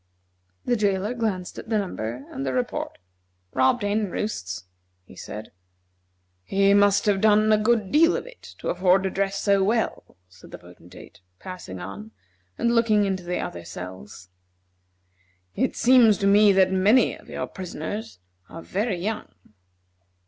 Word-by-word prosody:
The 245 Hz, -, +2 dB
jailer 205 Hz, 0 st, 0 dB
glanced 210 Hz, -7 st, -3 dB
at -, -, -11 dB
the 220 Hz, -, +1 dB
number, 125 Hz, -, -4 dB
and 135 Hz, -, -5 dB
the 135 Hz, -1 st, -2 dB
report. 125 Hz, -1 st, -3 dB, 0.6 s
"Robbed 130 Hz, -, +2 dB
hen 205 Hz, 0 st, 0 dB
roosts," 90 Hz, -, -4 dB, 0.4 s
he 95 Hz, -, -16 dB
said. 105 Hz, +3 st, -8 dB, 0.9 s
"He 195 Hz, -, +3 dB
must 200 Hz, 0 st, +4 dB
have 200 Hz, -2 st, +2 dB
done 215 Hz, 0 st, +4 dB
a -, -, +5 dB
good 215 Hz, -2 st, +1 dB
deal 330 Hz, +4 st, +4 dB
of -, -, -6 dB
it -, -, -14 dB, 0.2 s
to -, -, -5 dB
afford 185 Hz, +1 st, +3 dB
to 190 Hz, -, -1 dB
dress 195 Hz, +1 st, -1 dB
so 200 Hz, -1 st, +2 dB
well," 220 Hz, -, -1 dB
said 90 Hz, +1 st, -17 dB
the -, -, -9 dB
Potentate, 90 Hz, 0 st, -15 dB, 0.2 s
passing 180 Hz, -, -8 dB
on, 100 Hz, +4 st, -9 dB, 0.4 s
and 235 Hz, 0 st, +1 dB
looking 220 Hz, -3 st, +3 dB
into 180 Hz, -2 st, -2 dB
other 85 Hz, 0 st, -5 dB
cells. 90 Hz, +2 st, -10 dB, 1.2 s
"It -, -, -1 dB
seems 235 Hz, -4 st, +5 dB
to 195 Hz, -, -2 dB
me 205 Hz, +1 st, +6 dB
that 190 Hz, -1 st, +4 dB
many 200 Hz, +7 st, +3 dB
of -, -, -17 dB
your -, -, -4 dB
prisoners 180 Hz, -, -6 dB, 0.3 s
are 165 Hz, -, -9 dB
very 205 Hz, 0 st, -2 dB
young." 210 Hz, +5 st, -4 dB
195 Hz, 150 wpm, -24 LUFS, 130-215 Hz, 1.2 s, me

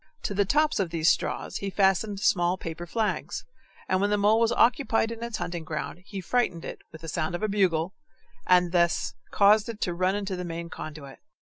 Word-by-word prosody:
To -, -, -2 dB
the 200 Hz, 0 st, +2 dB
tops 300 Hz, +6 st, +2 dB
of 190 Hz, -4 st, 0 dB
these 165 Hz, 0 st, +2 dB
straws -, -, -2 dB
he 200 Hz, -, -3 dB
fastened 195 Hz, +1 st, +1 dB
small 175 Hz, -1 st, +2 dB
paper 170 Hz, 0 st, -6 dB
flags, 220 Hz, +3 st, -2 dB, 0.4 s
and 185 Hz, 0 st, +1 dB
when 205 Hz, -, +2 dB
the 210 Hz, -, +2 dB
mole 210 Hz, +2 st, +4 dB
was 230 Hz, 0 st, +3 dB
occupied 230 Hz, -2 st, +2 dB
in 230 Hz, 0 st, -6 dB
its 235 Hz, -2 st, -3 dB
hunting 170 Hz, -5 st, -4 dB
ground, 155 Hz, +2 st, -5 dB
he 200 Hz, -2 st, -5 dB
frightened 185 Hz, -5 st, 0 dB
it -, -, -6 dB
with 160 Hz, -, -12 dB
the 165 Hz, -, -8 dB
sound 155 Hz, +2 st, -2 dB
of 175 Hz, -, -5 dB
a -, -, +2 dB
bugle, 190 Hz, -4 st, +1 dB, 0.5 s
and 180 Hz, -1 st, +4 dB
thus 170 Hz, -1 st, +2 dB, 0.2 s
caused 210 Hz, +2 st, +4 dB
it 225 Hz, -2 st, -6 dB
to 175 Hz, -, 0 dB
run 185 Hz, +2 st, +1 dB
into 200 Hz, -2 st, -3 dB
the 180 Hz, -, -4 dB
main 170 Hz, -1 st, -6 dB
conduit. 150 Hz, -3 st, -8 dB
190 Hz, 210 wpm, -27 LUFS, 170-210 Hz, 0.5 s, mole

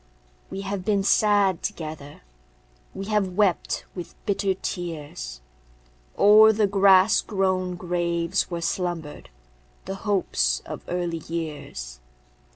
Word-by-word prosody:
We 195 Hz, -, -5 dB
have 195 Hz, -1 st, -4 dB
been 200 Hz, 0 st, +1 dB
sad 205 Hz, -3 st, +3 dB
together; 155 Hz, -3 st, -6 dB, 0.7 s
We 195 Hz, -, -5 dB
have 205 Hz, -3 st, 0 dB
wept 195 Hz, -3 st, +1 dB
with 175 Hz, -2 st, -8 dB
bitter 195 Hz, -1 st, 0 dB
tears 150 Hz, -, -6 dB, 0.8 s
O'er 215 Hz, +2 st, +8 dB
the 215 Hz, -1 st, +2 dB
grass 195 Hz, +1 st, +5 dB
grown 185 Hz, -3 st, -1 dB
graves 175 Hz, 0 st, -1 dB
where 170 Hz, -2 st, -4 dB
slumbered 170 Hz, -4 st, -3 dB, 0.6 s
The 195 Hz, -, -4 dB
hopes 115 Hz, -, 0 dB
of -, -, -7 dB
early 175 Hz, -2 st, -2 dB
years. 145 Hz, -, -6 dB
180 Hz, 110 wpm, -25 LUFS, 165-195 Hz, 0.8 s, O'er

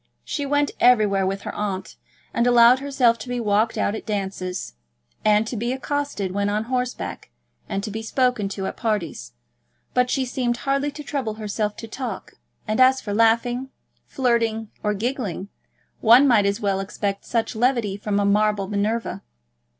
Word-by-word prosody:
She 285 Hz, -2 st, -3 dB
went 290 Hz, +1 st, +1 dB
everywhere 210 Hz, -6 st, +4 dB
with 195 Hz, +1 st, -3 dB
her -, -, -5 dB
aunt, 195 Hz, -2 st, -4 dB, 0.4 s
and 235 Hz, +1 st, +2 dB
allowed 240 Hz, +1 st, +7 dB
herself 265 Hz, -4 st, +2 dB
to 255 Hz, -, -8 dB
be 245 Hz, 0 st, -2 dB
walked 215 Hz, 0 st, +1 dB
out 205 Hz, -, +1 dB
at 220 Hz, -, -5 dB
dances, 190 Hz, -, -3 dB, 0.5 s
and 215 Hz, 0 st, +4 dB
to 235 Hz, -, -5 dB
be 235 Hz, +3 st, -1 dB
accosted 275 Hz, -8 st, -2 dB
when 200 Hz, +1 st, 0 dB
on 210 Hz, +1 st, 0 dB
horseback, 250 Hz, -, -3 dB, 0.4 s
and 195 Hz, -, -2 dB
to 215 Hz, -, -4 dB
be 220 Hz, +2 st, -4 dB
spoken 245 Hz, -3 st, 0 dB
to 195 Hz, -1 st, -4 dB
at -, -, -4 dB
parties; 170 Hz, -, -2 dB, 0.6 s
but 250 Hz, 0 st, +2 dB
she 265 Hz, 0 st, 0 dB
seemed 245 Hz, -1 st, -1 dB
hardly 275 Hz, +2 st, 0 dB
to 295 Hz, +1 st, -8 dB
trouble 265 Hz, -7 st, -3 dB
herself 210 Hz, -1 st, -2 dB
to 225 Hz, -, -7 dB
talk; 235 Hz, -3 st, -6 dB, 0.4 s
and 215 Hz, +2 st, -1 dB
as 260 Hz, +1 st, +6 dB
for 205 Hz, -, -5 dB
laughing, 235 Hz, +4 st, +2 dB, 0.4 s
flirting, 230 Hz, -4 st, 0 dB
or 210 Hz, -1 st, 0 dB
giggling, 210 Hz, -4 st, -3 dB, 0.5 s
one 245 Hz, +5 st, +7 dB
might 215 Hz, -6 st, +4 dB
as 200 Hz, 0 st, 0 dB
well 200 Hz, -2 st, 0 dB
expect 200 Hz, 0 st, -3 dB
such 230 Hz, 0 st, -1 dB
levity 235 Hz, -4 st, +1 dB
from 205 Hz, 0 st, -1 dB
a 200 Hz, -, +1 dB
marble 205 Hz, -1 st, +2 dB
Minerva. 210 Hz, +3 st, -1 dB
225 Hz, 170 wpm, -23 LUFS, 205-250 Hz, 0.6 s, allowed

